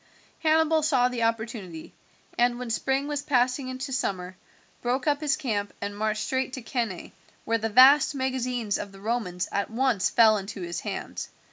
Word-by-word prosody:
Hannibal 320 Hz, 0 st, +3 dB
saw 265 Hz, -5 st, +3 dB
the 245 Hz, -2 st, -4 dB
opportunity, 220 Hz, -7 st, -3 dB, 0.4 s
and 240 Hz, 0 st, +2 dB
when 245 Hz, -2 st, -5 dB
spring 270 Hz, +4 st, 0 dB
was 295 Hz, -1 st, -2 dB
passing 255 Hz, -1 st, +1 dB
into 260 Hz, +1 st, -5 dB
summer 185 Hz, -7 st, -2 dB, 0.5 s
broke 250 Hz, +2 st, -1 dB
up 290 Hz, 0 st, +1 dB
his 305 Hz, 0 st, +1 dB
camp 210 Hz, -9 st, -2 dB
and 205 Hz, 0 st, -4 dB
marched 215 Hz, 0 st, -1 dB
straight 260 Hz, 0 st, -2 dB
to 260 Hz, -, -6 dB
Cannae, 230 Hz, -7 st, -3 dB, 0.3 s
where 230 Hz, 0 st, +1 dB
the 225 Hz, 0 st, -2 dB
vast 270 Hz, +6 st, +7 dB
magazines 250 Hz, -5 st, -1 dB
of 200 Hz, -, -6 dB
the 195 Hz, -, -14 dB
Romans 205 Hz, -5 st, -2 dB
at 200 Hz, -, -1 dB
once 235 Hz, -4 st, +1 dB
fell 220 Hz, -2 st, +5 dB
into 195 Hz, 0 st, -6 dB
his 170 Hz, -1 st, -4 dB
hands. -, -, -5 dB
245 Hz, 170 wpm, -26 LUFS, 210-265 Hz, 0.5 s, vast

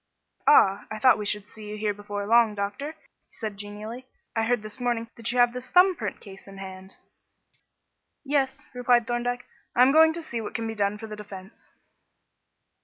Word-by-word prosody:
"Ah, 200 Hz, -8 st, +5 dB
I 215 Hz, -, -5 dB
thought 255 Hz, +1 st, +5 dB
we 210 Hz, -, -3 dB
should 210 Hz, 0 st, -2 dB
see 215 Hz, 0 st, -12 dB
you 210 Hz, -, -5 dB
here 210 Hz, -1 st, 0 dB
before 205 Hz, 0 st, -5 dB
long, 230 Hz, 0 st, +4 dB
doctor," 205 Hz, +10 st, -4 dB, 0.3 s
said 220 Hz, -1 st, -5 dB
he 200 Hz, -, -17 dB
genially. 210 Hz, +5 st, -8 dB, 0.3 s
"I 225 Hz, 0 st, +1 dB
heard 240 Hz, -1 st, +1 dB
this 215 Hz, +4 st, -7 dB
morning 235 Hz, -2 st, -1 dB
that 230 Hz, +1 st, -3 dB
you 250 Hz, -, -3 dB
have 245 Hz, -1 st, +5 dB
this 250 Hz, 0 st, -7 dB
thumb 365 Hz, +1 st, +6 dB
print 215 Hz, -9 st, -5 dB
case 195 Hz, -1 st, -13 dB
in 195 Hz, 0 st, -11 dB
hand." 190 Hz, 0 st, -9 dB, 1.3 s
"Yes," 275 Hz, 0 st, 0 dB
replied 245 Hz, -1 st, +3 dB
Thorndyke; 245 Hz, +1 st, -2 dB, 0.3 s
"I 245 Hz, -, +7 dB
am 260 Hz, -, +6 dB
going 320 Hz, +2 st, +7 dB
to 335 Hz, 0 st, -6 dB
see 235 Hz, -7 st, -4 dB
what 215 Hz, -, -7 dB
can 230 Hz, -, -2 dB
be 225 Hz, -, -3 dB
done 205 Hz, -1 st, 0 dB
for 220 Hz, -, -8 dB
the 215 Hz, -1 st, -7 dB
defence." 200 Hz, -1 st, -11 dB
225 Hz, 195 wpm, -26 LUFS, 205-245 Hz, 1.3 s, I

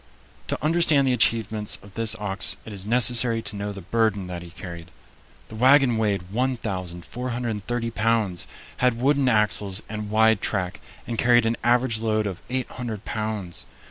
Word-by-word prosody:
To -, -, -1 dB
understand 155 Hz, -3 st, +4 dB
the 130 Hz, -, +3 dB
achievements 110 Hz, -3 st, +2 dB
of 100 Hz, -1 st, -15 dB
this 115 Hz, -1 st, +3 dB
ox 105 Hz, -3 st, -1 dB
it 110 Hz, -, -8 dB
is 100 Hz, 0 st, -5 dB
necessary 120 Hz, -1 st, +3 dB
to 105 Hz, -, -2 dB
know 100 Hz, 0 st, -4 dB
the 100 Hz, -1 st, -8 dB
burden 105 Hz, 0 st, 0 dB
that 90 Hz, -1 st, -6 dB
he 85 Hz, -, -10 dB
carried. 85 Hz, -1 st, -9 dB, 0.6 s
The 110 Hz, -, -9 dB
wagon 130 Hz, +1 st, +5 dB
weighed 100 Hz, -4 st, -1 dB
1430 115 Hz, +1 st, -3 dB
pounds, 110 Hz, -4 st, 0 dB, 0.3 s
had 125 Hz, -2 st, +1 dB
wooden 135 Hz, 0 st, +2 dB
axles 105 Hz, -3 st, +1 dB
and 105 Hz, -1 st, -5 dB
wide 110 Hz, 0 st, +3 dB
track, 90 Hz, -3 st, -2 dB, 0.3 s
and 115 Hz, -1 st, -4 dB
carried 120 Hz, -1 st, +4 dB
an 115 Hz, +1 st, +1 dB
average 120 Hz, -1 st, +2 dB
load 110 Hz, -1 st, 0 dB
of 95 Hz, -4 st, -5 dB
800 125 Hz, -4 st, -4 dB
pounds. 105 Hz, -5 st, -4 dB
110 Hz, 155 wpm, -24 LUFS, 100-120 Hz, 0.6 s, wagon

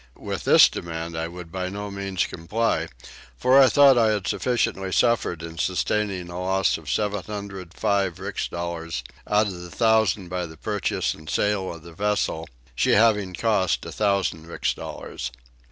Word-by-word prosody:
With -, -, -5 dB
this -, -, +8 dB
demand 85 Hz, 0 st, -5 dB
I 80 Hz, 0 st, -2 dB
would 85 Hz, -1 st, -9 dB
by 90 Hz, 0 st, -3 dB
no 100 Hz, +1 st, -5 dB
means 100 Hz, -2 st, -1 dB
comply 105 Hz, +7 st, -1 dB, 0.5 s
for 130 Hz, +2 st, +6 dB
I 130 Hz, -, +7 dB
thought 140 Hz, -3 st, +6 dB
I 115 Hz, -, +4 dB
had 105 Hz, -3 st, 0 dB
sufficiently 115 Hz, -6 st, 0 dB
suffered 110 Hz, -8 st, +1 dB
in 85 Hz, 0 st, -7 dB
sustaining 100 Hz, +1 st, 0 dB
a 85 Hz, +1 st, -6 dB
loss 95 Hz, -1 st, +1 dB
of 75 Hz, -, -10 dB
705 100 Hz, -2 st, -2 dB
rix 95 Hz, 0 st, -3 dB
dollars 85 Hz, -6 st, -4 dB, 0.2 s
out 105 Hz, +1 st, +3 dB
of 100 Hz, -, -3 dB
1000 100 Hz, +2 st, +1 dB
by 90 Hz, 0 st, -3 dB
the 80 Hz, 0 st, -13 dB
purchase 105 Hz, +5 st, -1 dB
and 80 Hz, 0 st, -12 dB
sale 105 Hz, +1 st, 0 dB
of 85 Hz, -2 st, -10 dB
the 85 Hz, 0 st, -12 dB
vessel, 100 Hz, -4 st, -1 dB, 0.2 s
she -, -, +2 dB
having 105 Hz, -4 st, +3 dB
cost 105 Hz, -5 st, +1 dB
1000 100 Hz, -6 st, 0 dB
rix 85 Hz, -, -1 dB
dollars. -, -, -6 dB
95 Hz, 155 wpm, -24 LUFS, 85-105 Hz, 0.5 s, this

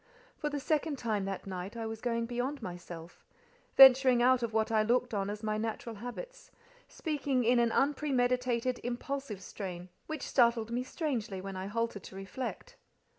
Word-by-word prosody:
For 300 Hz, -, -2 dB
the 290 Hz, -1 st, -3 dB
second 300 Hz, +1 st, 0 dB
time 215 Hz, -5 st, -1 dB
that 195 Hz, -1 st, -4 dB
night 190 Hz, +3 st, -6 dB
I 225 Hz, -, -3 dB
was 220 Hz, 0 st, -5 dB
going 230 Hz, -1 st, 0 dB
beyond 245 Hz, +3 st, -3 dB
myself—venturing 240 Hz, -, +3 dB
out 255 Hz, 0 st, +5 dB
of 235 Hz, -2 st, -1 dB
what 220 Hz, 0 st, +1 dB
I 220 Hz, -1 st, +4 dB
looked 245 Hz, +2 st, +1 dB
on 200 Hz, -1 st, -1 dB
as 210 Hz, +1 st, -5 dB
my 215 Hz, 0 st, -1 dB
natural 225 Hz, 0 st, -4 dB
habits—speaking 325 Hz, -, -4 dB
in 240 Hz, +1 st, +4 dB
an 235 Hz, -1 st, +3 dB
unpremeditated, 250 Hz, -3 st, +1 dB
impulsive 245 Hz, -4 st, -4 dB
strain, 180 Hz, -3 st, -6 dB, 0.2 s
which 310 Hz, -3 st, -4 dB
startled 235 Hz, -3 st, +3 dB
me 245 Hz, +1 st, 0 dB
strangely 250 Hz, -, -3 dB
when 195 Hz, +1 st, -6 dB
I 185 Hz, +1 st, -4 dB
halted 230 Hz, -1 st, -2 dB
to -, -, -10 dB
reflect. 255 Hz, -, -6 dB
240 Hz, 160 wpm, -32 LUFS, 215-270 Hz, 0.2 s, out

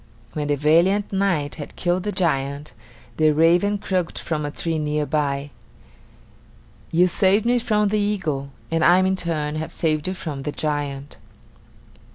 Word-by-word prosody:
When 150 Hz, -1 st, -3 dB
the 145 Hz, -, +2 dB
valiant 170 Hz, +8 st, +2 dB
knight 185 Hz, -7 st, 0 dB
had 145 Hz, -, -9 dB
killed 175 Hz, +1 st, 0 dB
the 210 Hz, +3 st, -3 dB
giant, 145 Hz, -5 st, -1 dB, 0.4 s
the 155 Hz, -1 st, +4 dB
raven 170 Hz, +7 st, +3 dB
croaked 185 Hz, -3 st, -2 dB
from 150 Hz, -3 st, -2 dB
a -, -, -3 dB
tree 160 Hz, +2 st, -3 dB
near 150 Hz, 0 st, -1 dB
by: 145 Hz, -1 st, -1 dB, 1.4 s
"You 175 Hz, +2 st, +4 dB
saved 195 Hz, +4 st, +2 dB
me 245 Hz, +1 st, +3 dB
from 210 Hz, -3 st, +1 dB
the 210 Hz, +1 st, +1 dB
eagle, 165 Hz, -10 st, -1 dB, 0.2 s
and 165 Hz, -1 st, +1 dB
I 175 Hz, +1 st, +6 dB
in 190 Hz, 0 st, +2 dB
turn 155 Hz, -4 st, -2 dB
have 155 Hz, -, -4 dB
saved 155 Hz, -1 st, -1 dB
you 185 Hz, -, -2 dB
from 150 Hz, -6 st, -5 dB
the 150 Hz, -, -3 dB
giant." 145 Hz, -2 st, -3 dB
160 Hz, 160 wpm, -22 LUFS, 150-190 Hz, 1.4 s, I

